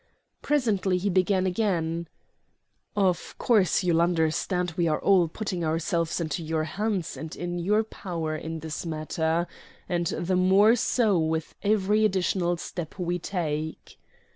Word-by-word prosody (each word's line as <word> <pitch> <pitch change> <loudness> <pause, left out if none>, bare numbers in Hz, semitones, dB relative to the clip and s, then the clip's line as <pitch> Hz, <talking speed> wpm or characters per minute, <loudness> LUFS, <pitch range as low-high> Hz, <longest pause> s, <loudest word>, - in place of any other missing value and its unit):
Presently 210 -10 +1
he 195 +2 0
began 185 +1 +2
again: 170 -4 0 0.9
"Of 190 -4 0
course 205 -6 +3
you'll 170 -2 +3
understand 175 +1 +1
we 170 -1 +1
are 155 - +1
all 190 -4 +4
putting 185 0 -4
ourselves 165 +1 0
into 165 0 -2
your 160 0 -1
hands 195 +1 -2
and 160 -1 -7
in 175 0 -4
your 210 +5 +2
power 170 -7 -4
in 160 +1 -5
this 160 -1 -5
matter; 160 +1 -1 0.4
and 175 -2 0
the 175 +4 -1
more 195 +5 +5
so 225 -5 +2
with 160 0 -1
every 210 +1 +2
additional 185 -3 +1
step 170 -1 -6
we 175 -1 -1
take." 160 -4 -4
175 Hz, 140 wpm, -26 LUFS, 160-195 Hz, 0.9 s, more